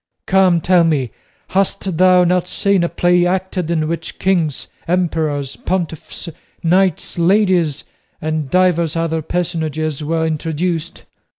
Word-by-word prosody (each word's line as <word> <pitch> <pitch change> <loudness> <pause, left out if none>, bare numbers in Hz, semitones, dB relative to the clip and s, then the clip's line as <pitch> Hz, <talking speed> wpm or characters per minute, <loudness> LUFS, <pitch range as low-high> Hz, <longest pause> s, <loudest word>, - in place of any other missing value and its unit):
Come, 185 -3 +3
tell 180 0 +4
me, 145 -7 0 0.4
hast 195 -2 -1
thou 185 -1 +6
not 180 0 +1
seen 200 -2 +1
a 170 - 0
play 175 0 +2
acted 185 -2 -2
in 160 -2 0
which 165 0 -5
kings, 170 -7 0 0.2
emperors, 160 -6 -1
pontiffs, 175 -2 -4 0.4
knights, 180 0 +1
ladies, 175 -5 +2 0.4
and 155 -2 -3
divers 170 -2 +2
other 165 -1 -1
personages 155 -3 -2
were 160 +1 0
introduced? 160 +1 -3
170 Hz, 120 wpm, -18 LUFS, 160-185 Hz, 0.4 s, thou